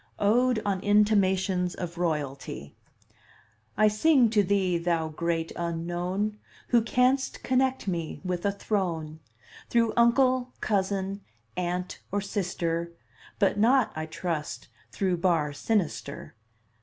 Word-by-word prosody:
ODE 240 +3 +3
ON 195 -2 0
INTIMATIONS 190 -3 +2
OF 175 -2 -5
ROYALTY 140 - -3 1.0
I 215 +1 +5
sing 240 +2 +4
to 215 -2 +4
thee, 190 -3 +1
thou 165 -2 0
Great 165 +1 -2
Unknown, 175 +5 -2 0.3
Who 235 - +5
canst 250 +4 +1
connect 260 -2 +1
me 170 -4 -3
with 180 -1 -2
a 200 - +2
throne 170 -7 -2 0.5
Through 230 -2 +2
uncle, 250 +1 +3
cousin, 195 -1 -1 0.3
aunt, 180 0 -3
or 205 - +1
sister, 170 -4 -2 0.4
But 205 0 +2
not, 245 +2 +4
I 155 0 -4
trust, 160 -2 -4 0.2
through 185 -3 0
bar 165 -5 +1
sinister. 170 -5 -2
190 Hz, 115 wpm, -27 LUFS, 170-215 Hz, 1.0 s, I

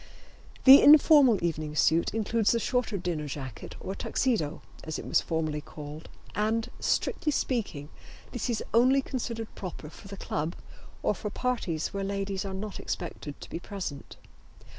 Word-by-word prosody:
The 270 +1 +10
informal 290 -5 +7
evening 155 -3 -2
suit 160 +2 +3
includes 225 0 +1
the 235 - +1
shorter 245 -3 0
dinner 170 -5 -3
jacket 135 -5 -7
or 190 - -5
Tuxedo, 195 - -1 0.2
as 160 -1 -4
it - - -7
was - - +2
formerly 155 -2 -2
called, 150 +1 -9 0.2
and, 220 +2 0
strictly 305 - 0
speaking, 205 - -2 0.4
this 245 +1 -3
is 230 - -1
only 255 +4 +5
considered 230 -4 -4
proper 170 -5 -7
for - - -13
the 200 0 -8
club 155 -1 -3 0.5
or - - +2
for 210 +1 -5
parties 200 -10 -2
where 200 0 -2
ladies 195 0 -2
are 190 -1 -4
not 205 +1 -5
expected 155 -4 -5
to - - -9
be - - -4
present. 180 -7 -7
195 Hz, 155 wpm, -28 LUFS, 160-230 Hz, 0.5 s, The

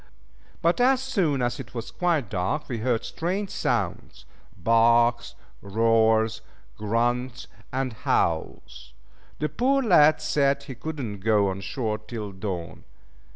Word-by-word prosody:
But 170 +8 +2
as 260 +1 +4
soon 190 - 0
as 120 - -1
it - - -9
was 115 -1 -5
quite 170 - 0
dark 95 - -2
we 120 -4 -4
heard 115 0 0
strange 190 +4 -3
sounds - - -2 0.3
barks, 115 +4 +3 0.3
roars, 110 +1 +2 0.3
grunts, 120 +2 -1 0.3
and 130 -2 -2
howls. 60 - -2 0.4
The 150 - -1
poor 270 - +1
lad 155 -8 +5
said 140 -2 +1
he 140 -2 -8
could 155 +5 -6
not 110 -7 -5
go 105 -1 +2
on 95 +1 -4
shore 110 0 -3
till 110 -1 -7
dawn. 90 -4 -6
120 Hz, 130 wpm, -25 LUFS, 110-150 Hz, 0.4 s, lad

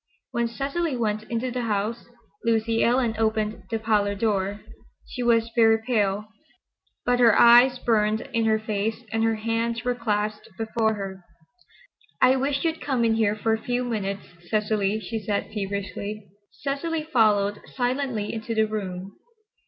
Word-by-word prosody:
When 235 0 0
Cecily 280 +4 -2
went 215 -2 -1
into 240 +2 -2
the 250 0 -2
house, 220 +1 -2 0.4
Lucy 230 0 +1
Ellen 240 -1 +2
opened 220 0 -1
the 225 - 0
parlor 210 -2 +1
door. 200 -1 -1 0.4
She 250 - -6
was 230 -1 +2
very 225 -1 +5
pale, 210 -4 +1 0.8
but 245 0 +2
her 230 -3 +6
eyes 245 +2 +7
burned 215 -2 +1
in 230 -1 +1
her 220 0 +3
face 220 +1 -2
and 225 0 0
her 225 0 +2
hands 230 +1 -1
were 245 - +1
clasped 210 -3 -2
before 220 0 0
her. 190 -2 -6 1.0
"I 260 - +5
wish 275 +1 0
you'd 325 0 -1
come 255 -5 0
in 225 - +3
here 220 -2 +2
for 220 +1 0
a 220 - -2
few 245 0 -1
minutes, 200 -5 -3 0.3
Cecily," 215 -1 +1
she 220 +2 -4
said 205 0 -2
feverishly. 200 0 -4 0.2
Cecily 305 +3 -3
followed 210 -8 +2
silently 250 -4 -2
into 225 0 -4
the 220 0 +3
room. 195 -3 -5
225 Hz, 150 wpm, -25 LUFS, 210-240 Hz, 1.0 s, eyes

